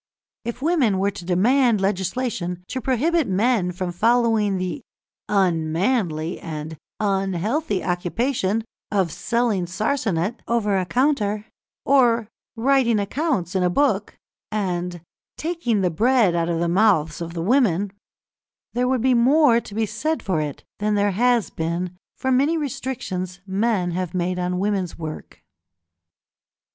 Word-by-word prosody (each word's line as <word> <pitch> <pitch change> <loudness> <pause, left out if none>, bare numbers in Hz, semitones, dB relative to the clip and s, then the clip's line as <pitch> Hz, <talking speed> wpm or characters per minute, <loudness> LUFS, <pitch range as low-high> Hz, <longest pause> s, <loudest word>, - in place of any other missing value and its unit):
If 235 +2 -5
women 290 - +2
were 200 +1 +1
to 190 -3 -9
demand 230 +6 +3
legislation 190 -1 -2
to 260 - -3
prohibit 295 +5 +1
men 195 -1 +1
from 180 0 -3
following 225 0 +2
the 180 -4 -3 0.5
"unmanly" 170 -1 0
and 155 -1 -6 0.2
"unhealthy" 195 - 0
occupation 205 +4 0 0.3
of 190 -5 +1
selling 210 0 0
sarsanet 210 0 -1
over 215 -4 +1
a 185 -2 0
counter, 215 - +1 0.4
or 240 -5 +4 0.3
writing 240 -1 +3
accounts 205 - -1
in 190 - +1
a 180 - +3
book, 210 -1 +1 0.3
and 180 -4 -2 0.4
"taking 310 - -1
the 180 -2 +1
bread 225 +1 +3
out 170 0 0
of 165 -1 0
the 170 - +1
mouths 170 -5 +2
of 170 0 -5
the 165 - -2
women," 205 -4 +2 0.8
there 250 +1 +1
would 255 -2 +1
be 260 +1 +3
more 245 0 +5
to 205 - -11
be 225 0 +1
said 275 +10 -2
for 185 -6 0
it 150 -2 -5 0.2
than 210 0 +1
there 205 0 +2
has 235 -1 +2
been 170 +2 -3 0.2
for 260 - -1
many 280 +6 +3
restrictions 250 - -4
men 195 -2 0
have 180 0 -3
made 180 0 -1
on 180 0 -1
women's 195 -2 -1
work. 155 -2 -8
205 Hz, 135 wpm, -23 LUFS, 180-245 Hz, 0.8 s, more